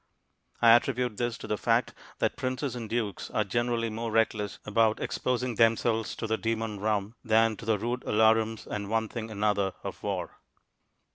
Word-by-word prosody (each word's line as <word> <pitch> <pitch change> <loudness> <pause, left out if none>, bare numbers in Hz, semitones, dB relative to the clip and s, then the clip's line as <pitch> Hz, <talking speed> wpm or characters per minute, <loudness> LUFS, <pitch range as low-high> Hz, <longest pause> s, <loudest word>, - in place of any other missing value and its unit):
I 115 - +9
attribute 120 -1 +3
this 120 -1 -1
to - - -9
the 105 - -2
fact - - +1 0.2
that - - 0
princes 130 0 -2
and 115 -3 -6
dukes 110 -5 -2
are 110 - +1
generally 115 +2 -1
more 115 +1 -3
reckless 110 -2 +1
about 110 +1 +2
exposing 125 -1 -1
themselves 115 0 +2
to - - -4
the 110 0 -1
demon 115 -2 -2
rum 105 0 -1
than 115 -1 +3
to - - -9
the 110 -1 +2
rude 120 +4 -2
alarums 110 +1 +3
and 100 -1 -4
one 110 0 0
thing 115 -2 -5
another 105 -2 0
of - - -6
war. - - -4
115 Hz, 170 wpm, -28 LUFS, 105-120 Hz, 0.2 s, I